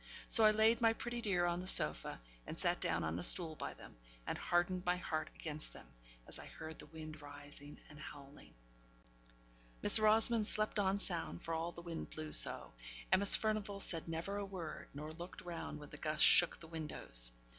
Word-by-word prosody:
So 225 - +8
I - - +7
laid 220 +2 +2
my 225 -1 +3
pretty 240 +1 -6
dear 190 -6 0
on 175 0 -1
the 185 - -7
sofa, 75 - +5 0.3
and - - -7
sat - - -1
down - - -1
on 80 +2 -3
a - - -5
stool 160 - +4
by - - -7
them, - - -15 0.3
and - - -4
hardened 175 +1 -1
my 180 0 0
heart 155 -3 -4
against 155 -1 -7
them, - - -14 0.4
as - - -9
I - - -11
heard 160 0 -10
the - - -9
wind 155 -1 -11
rising 145 0 -11
and 150 - -15
howling. 145 -1 -13 1.3
Miss - - +8
Rosamond 215 +1 +3
slept 215 -1 0
on 195 0 0
sound, 175 -3 -6
for 165 - -5
all 165 +1 -3
the 170 - -10
wind 170 -1 -7
blew 155 -1 -8
so - - +4 0.4
Miss 200 +1 +6
Furnivall 215 -2 -3
said 165 -4 -1
never 165 +5 -5
a 205 - -4
word, 175 -6 -8
nor 150 +2 -7
looked 170 +3 -10
round 170 -3 -7
when 145 -1 -12
the 150 - -10
gusts 155 0 -1
shook 175 - +4
the 165 - -12
windows. 150 - -2
170 Hz, 195 wpm, -35 LUFS, 155-200 Hz, 1.3 s, So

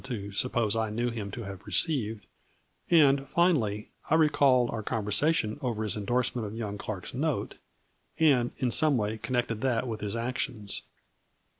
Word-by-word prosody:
127 100 -5 -5
to - - -11
suppose 115 -2 0
I 110 -1 0
knew 120 +3 -1
him 105 -3 -5
to 115 +4 -6
have 100 -1 -9
received, 110 - 0 0.6
and, 140 -5 +4
finally, 120 - +1 0.2
I 160 - +4
recalled 140 -6 +4
our 115 - -3
conversation 110 +5 +1
over 115 -5 -2
his 105 -4 -2
in 105 -2 -5
dorsement 120 -2 0
of 105 - -7
young 105 -3 -4
Clark's 100 -4 -6
note, 145 +3 -2 0.6
and, 135 -7 +4
in 125 -3 0
some 150 +1 +4
way, 110 0 -2
connected 120 -2 -2
that 130 -1 0
with 110 -2 -4
his 105 +1 -3
actions. 115 -3 -2
115 Hz, 165 wpm, -28 LUFS, 105-130 Hz, 0.6 s, and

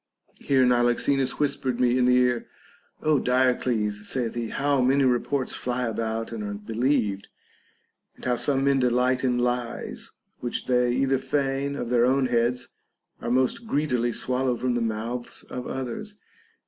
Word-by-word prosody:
Here 130 -2 +3
Niloxenus 125 +2 +2
whispered 135 -4 -1
me 125 -1 +3
in 125 -1 +3
the 125 0 +5
ear: 125 -1 +1 0.6
Ο 155 -2 +3
Diodes, 125 -5 +1
saith 120 0 -2
he, 120 -2 -3
how 140 -1 +1
many 135 +2 +3
reports 130 +1 0
fly 125 0 -2
about 115 0 -3
and 110 -2 -5
are 105 0 -4
believed, 110 -1 -1 0.9
and - - -13
how 125 -1 +2
some 135 +2 +1
men 140 -1 +3
delight 125 +1 +2
in 125 -2 +2
lies 120 -1 -2 0.3
which 120 - -3
they 125 -1 +2
either 135 +1 +1
feign 140 0 -1
of 120 -4 -4
their 120 0 +4
own 135 +1 +2
heads 120 0 0 0.5
or - - -3
most 130 - +1
greedily 125 - 0
swallow 125 +1 0
from 125 0 0
the 120 - 0
mouths 115 +2 -3
of 125 - -5
others. 135 - -5
125 Hz, 155 wpm, -25 LUFS, 120-135 Hz, 0.9 s, the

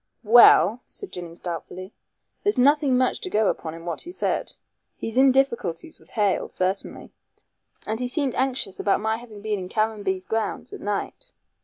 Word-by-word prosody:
"Well," 235 +1 +7
said 400 - -9
Jennings 170 -1 -8
doubtfully, 180 +3 -7 0.5
"there's 410 - +1
nothing 280 0 +4
much 255 0 +1
to 370 - -4
go 215 - +2
upon 160 -1 -4
in 165 0 -11
what 170 -2 -4
he 350 - -8
said. - - -2 0.5
He's 225 - -5
in 265 +1 +6
difficulties 235 -11 -1
with 160 - -22
Hale 205 -3 +1
certainly 185 +2 -3 0.4
" - - -29
"And 220 +1 -3
he 250 - -1
seemed 270 -1 0
anxious 260 -7 -2
about 200 - +2
my 220 +1 -1
having 220 -4 -12
been 215 -2 -1
in 180 -1 -7
Caranby's 205 -4 -1
grounds 225 0 -3
at - - -8
night." 210 - -4
220 Hz, 175 wpm, -24 LUFS, 190-255 Hz, 0.5 s, Well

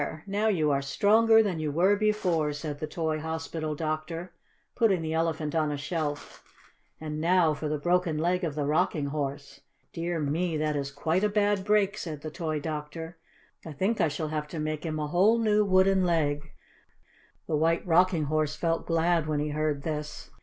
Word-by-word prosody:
Now 205 +2 0
you 160 -8 +2
are 140 0 +1
stronger 220 +10 +4
than 185 -6 -2
you 155 -2 -2
were 180 +7 +3
before," 185 -8 +1
said 145 -1 -5
the 155 - -3
toy 160 -1 -2
hospital 160 -1 -4
doctor, 155 +3 -4 0.4
putting 195 -8 +2
the 160 0 -2
Elephant 160 -2 -1
on 155 -2 +1
a 145 - -2
shelf. 145 0 -4 0.6
"And 155 -1 -5
now 170 -1 +3
for 150 +1 -4
the 150 - -1
broken 175 +1 +1
leg 180 +3 0
of 155 -4 -2
the 145 -2 -1
Rocking 155 0 +1
Horse. 140 -1 -4 0.3
Dear 170 0 -2
me, 155 +3 -1
that 150 0 0
is 140 -1 -2
quite 160 +7 -1
a 210 - +3
bad 205 -1 +1
break," 205 -1 +2
said 155 -4 -6
the 155 +1 -6
toy 155 -2 -3
doctor. 160 +2 -6 0.5
"I 160 - -8
think 195 +10 0
I - - +4
shall 150 +1 -3
have 150 -1 -3
to 160 +1 -6
make 155 +1 -3
him 155 -1 -3
a 150 - -2
whole 190 +9 +3
new 210 -2 +3
wooden 190 -1 +3
leg." 155 -3 0 1.0
The 155 - -1
White 165 +2 +1
Rocking 175 -1 +3
Horse 155 0 0
felt 165 +1 -1
glad 165 -1 +2
when 150 -1 0
he 150 +1 -1
heard 150 -1 -1
this. 150 -2 -5
160 Hz, 190 wpm, -28 LUFS, 150-180 Hz, 1.0 s, stronger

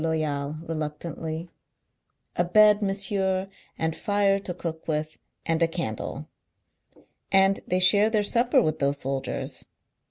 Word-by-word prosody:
Loyal, 155 -3 -1
reluctantly; 160 +1 -5 0.8
"a 175 - +2
bed, 210 +4 +5
monsieur, 195 -1 0 0.3
and 160 0 -1
fire 200 -1 +2
to 195 - -6
cook 165 -2 -6
with, 155 0 -2 0.3
and 165 0 0
a 165 - +5
candle. 165 -10 -4 1.0
Andthey 195 -1 +3
share 200 +4 +5
theirsupper 230 +3 +3
with 155 0 -1
those 140 0 +1
soldiers. 135 -1 -3
170 Hz, 115 wpm, -26 LUFS, 155-195 Hz, 1.0 s, bed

